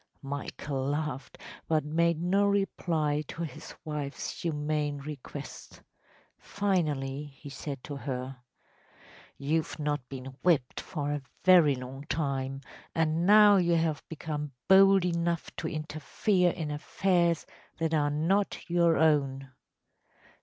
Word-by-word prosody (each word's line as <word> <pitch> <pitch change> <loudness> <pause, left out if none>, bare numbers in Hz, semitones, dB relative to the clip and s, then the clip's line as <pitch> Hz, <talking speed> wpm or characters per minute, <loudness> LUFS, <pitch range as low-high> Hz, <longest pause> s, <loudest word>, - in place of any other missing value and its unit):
‚ÄĚ 135 - -14
Michael 140 -1 -3
laughed, 145 -2 -3 0.3
but 155 -2 +1
made 165 +1 +2
no 185 +4 +2
reply 165 -7 0
to 170 - -5
his 155 -1 -8
wife’s 150 -2 -4
humane 150 -2 -1
request. 140 -1 -9 0.6
Finally 150 -8 -1
he 140 0 -12
said 135 -1 -6
to 145 - -6
her: 130 -1 -4 1.0
“You’ve 155 +3 -1
not 145 -4 -2
been 130 -1 -7
whipped 155 -8 +2
for 145 -5 -3
a 145 -1 -2 0.2
very 175 -6 +7
long 130 +2 -8
time, 135 -3 -2 0.3
and 160 +2 +1
now 210 -1 +8
you 175 -2 +3
have 160 -2 0
become 150 -2 -4
bold 195 -1 +7
enough 170 -1 -1
to - - -3
interfere 155 +5 0
in 160 -3 -3
affairs 170 +2 +1 0.3
that 160 0 -1
are 145 -2 +2
not 170 +8 0
your 170 -2 +3
own. 135 -4 +2
155 Hz, 125 wpm, -29 LUFS, 140-170 Hz, 1.0 s, now